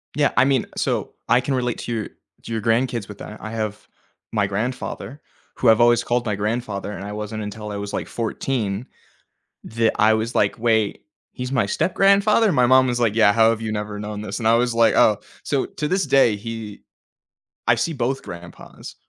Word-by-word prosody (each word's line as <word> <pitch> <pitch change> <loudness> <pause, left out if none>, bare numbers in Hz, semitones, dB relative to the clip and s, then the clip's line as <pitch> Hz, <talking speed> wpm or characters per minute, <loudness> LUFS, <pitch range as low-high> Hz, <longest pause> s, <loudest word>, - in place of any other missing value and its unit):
Yeah, 145 -1 +2
I 125 - +6
mean 135 -3 +2
so - - -1
I 125 - +4
can 135 - -2
relate 125 -2 -1
to - - -5
your 110 -3 -2 0.4
to - - -9
your 110 -1 -2
grandkids 115 -1 0
with 105 - -10
that. 105 - -9
I 110 - -6
have 110 -2 -4 0.4
my 105 -3 +1
grandfather, 125 +6 -4 0.3
who 125 - +3
I've 110 +1 +5
always 120 -1 +4
called 120 0 0
my 105 -2 -1
grandfather, 105 -1 -3
and 100 -1 -7
I 105 - -6
wasn't 105 +1 -5
until 105 0 -6
I 100 - -4
was, 100 0 -5
like, - - -3
14, 115 -2 -2 0.8
that 115 0 +1
I 110 +1 +5
was 110 +2 -2
like, 100 - +2
"Wait, 110 -2 +1 0.3
he's 125 0 -5
my 125 -6 +2
step-grandfather?" 200 - +3
My 125 -5 +3
mom 130 +1 +5
was 120 -1 -1
like, 115 -3 +2
"Yeah, 105 -3 +5
how 115 0 +5
have 115 0 -3
you 110 - -3
never 105 -1 -4
known 105 0 -5
this?" 105 -1 -5
And 115 - 0
I 115 - +5
was 120 0 +1
like, 115 -1 +4
"Oh," 105 -2 +4 0.2
so 140 -2 0
to 150 - -4
this 190 +3 +1
day, 125 -6 +4
he 110 0 -7 0.9
I 115 - +5
see 115 +8 -1
both 135 -1 -2
grandpas, 85 0 -10
115 Hz, 205 wpm, -22 LUFS, 105-125 Hz, 0.9 s, I